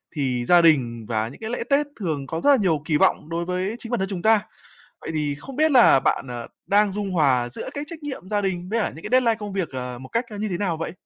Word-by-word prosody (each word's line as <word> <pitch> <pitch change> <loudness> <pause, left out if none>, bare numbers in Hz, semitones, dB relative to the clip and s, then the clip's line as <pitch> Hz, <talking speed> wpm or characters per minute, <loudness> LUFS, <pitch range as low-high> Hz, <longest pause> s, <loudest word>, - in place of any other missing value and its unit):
thì 125 -4 -1
gia 175 +3 +6
đình 120 -9 +2
vào 110 -1 -1
những 130 - -13
cái 220 - -4
lễ 245 - -2
Tết 285 +1 +3
thường 150 -8 -3
có 160 +2 -4
rất 285 - +3
là 280 - +8
nhiều 170 - +1
kỳ 155 -2 +2
vọng 150 - +2
đối 170 +1 -2
với 185 +4 -2
chính 230 - -8
bản 240 - 0
thân 190 +1 -1
chúng 185 -3 -4
ta. 220 -1 +4 0.6
Vậy - - -6
thì 150 -2 -1
không 265 - -10
biết 310 +1 +3
là 240 - +6
bạn, 135 - 0
à, 120 -1 -6 0.2
đang 205 0 +3
dung 205 -1 -3
hòa 135 -8 +2
giữa 120 - -7
cái 285 +1 -4
trách 320 -1 -9
nhiệm 265 -10 -6
gia 210 -1 0
đình 185 -2 -2
với 230 +2 0
cả - - 0
những 160 - -11
cái - - -4
deadline 245 -3 +4
công 205 -2 -6
việc, 190 -4 -1
ờ, 125 -2 -5
một 130 +1 -10
cách 230 +2 -1
như 215 +1 -2
thế 180 -2 -3
nào 180 -5 -1
vậy? 165 - -4
180 Hz, 280 wpm, -23 LUFS, 145-220 Hz, 0.6 s, là